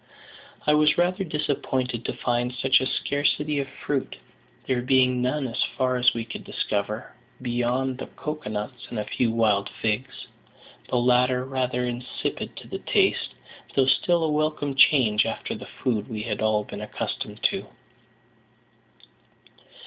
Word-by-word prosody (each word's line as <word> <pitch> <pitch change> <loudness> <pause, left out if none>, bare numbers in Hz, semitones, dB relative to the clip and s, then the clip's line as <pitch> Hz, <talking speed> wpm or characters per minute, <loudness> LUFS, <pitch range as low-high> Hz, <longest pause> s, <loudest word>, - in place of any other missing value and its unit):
I 150 - +5
was 150 0 +4
rather 180 +2 +2
disappointed 130 -6 -1
to - - -1
find 120 0 0
such 130 +1 +3
a 130 - 0
scarcity 145 +2 0
of 135 - -2 0.2
fruit, 140 -3 -1 0.5
there 130 -2 +1
being 125 0 +3
none, 130 +2 0
as 115 - -3 0.2
far 130 -1 +2
as 125 -1 +4
we 115 -1 -2
could - - -7
discover, 105 +2 -3 0.3
beyond 125 +1 -1
the - - -5
cocoa 150 -4 -5
nuts 110 +4 -5
and 120 - -5
a 105 - -1
few 120 - 0
wild 110 -3 +2
figs: 110 +4 -2 0.6
the 125 - +1
latter 125 +1 +3
rather 130 -2 -1
insipid 125 0 -4
to - - -10
the - - -5
taste, - - +1 0.4
though 135 - +5
still 170 +5 +3
a 155 - +1
welcome 150 -2 0
change 125 -6 +5
after - - -3
the - - -8 0.2
food 110 -5 0
we 110 -2 -4
had 110 -2 -3
all 110 -1 +2
been - - -8
accustomed - - -5
to. - - -5
125 Hz, 150 wpm, -25 LUFS, 120-140 Hz, 0.6 s, I